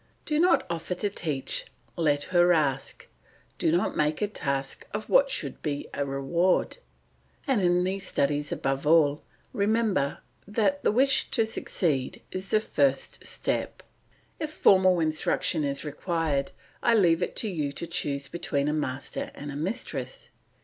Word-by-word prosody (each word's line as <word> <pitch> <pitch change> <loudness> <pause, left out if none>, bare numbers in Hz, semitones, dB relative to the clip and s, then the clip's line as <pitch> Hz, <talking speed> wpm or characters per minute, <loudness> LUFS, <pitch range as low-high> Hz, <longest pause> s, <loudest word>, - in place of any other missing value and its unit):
Do 300 -1 +1
not 360 +2 +4
offer 170 +2 -3
to 200 +3 -2
teach, 150 -8 -2 0.3
let 145 -3 +2
her 175 0 +5
ask; 140 -5 -1 0.5
do - - +2
not 175 +3 +1
make 150 0 +1
a 210 - +1
task 140 -8 -3
of - - -5
what - - +5
should - - -3
be 145 -2 -3
a 140 - -1
reward, 155 - +1 0.7
and 265 -7 +2
in 180 0 +3
these 190 +1 -2
studies 145 +1 0
above 135 +2 -1
all 150 -2 +4 0.3
remember 205 -8 +1 0.3
that 200 -2 +1
the - - +3
wish 265 +5 +3
to 225 -4 +2
succeed 160 -10 -1
is 185 +1 -5
the 215 - +4
first 140 -10 0
step. - - -2 0.6
If 310 - -2
formal 185 - +5
instruction 155 0 +1
is 140 0 -2
required 150 -2 -1 0.3
I 235 - +4
leave 175 -5 +4
it - - -2
to 225 - 0
you 155 -8 -2
to 170 - -3
choose 145 -5 -2
between 145 -4 -1
a 150 - +1
master 135 -3 -3
and 145 0 -7
a - - -7
mistress. 200 - -4
165 Hz, 155 wpm, -27 LUFS, 145-195 Hz, 0.7 s, her